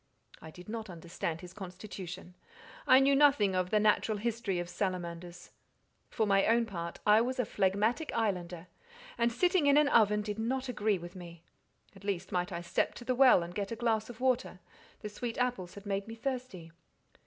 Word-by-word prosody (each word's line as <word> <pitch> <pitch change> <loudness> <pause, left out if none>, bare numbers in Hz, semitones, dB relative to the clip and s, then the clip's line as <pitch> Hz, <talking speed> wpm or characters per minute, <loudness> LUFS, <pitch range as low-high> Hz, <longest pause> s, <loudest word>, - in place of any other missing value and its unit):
"I 160 - -10
did 180 +3 -13
not 220 -1 -5
understand 170 -1 -5
his 180 0 -11
constitution. 185 -2 -8 0.5
I 260 - +8
knew 275 +1 +4
nothing 275 -9 +4
of 185 -1 0
the 215 - +3
natural 215 0 +2
history 220 -3 -2
of 175 0 -3
salamanders. 175 -2 -5 0.6
For 220 - 0
my 195 -1 +3
own 230 +1 +3
part, 170 -5 -6
I 210 +1 +6
was 255 +2 -2
a 250 - 0
phlegmatic 210 - 0
islander, 180 -6 -2 0.5
and 235 0 +1
sitting 350 +4 +2
in 285 0 +5
an 300 -1 +4
oven 210 -3 +4
did 210 0 -5
not 260 +4 -2
agree 215 -4 0
with 175 +1 -10
me; 170 -2 -11 0.5
at 195 - -15
least, 190 -2 -3
might 180 -1 -1
I 170 -1 -4
step 175 - -1
to 240 - -10
the 255 - +1
well, 250 -8 +6
and 170 +1 -8
get 200 +1 -4
a - - -2
glass 225 -1 0
of 240 - -10
water—the 250 -5 -3
sweet 230 +2 -5
apples 245 -8 -2
had 200 0 -11
made 200 0 -2
me 225 - -7
thirsty?" 245 -9 -5
210 Hz, 190 wpm, -31 LUFS, 180-235 Hz, 0.6 s, I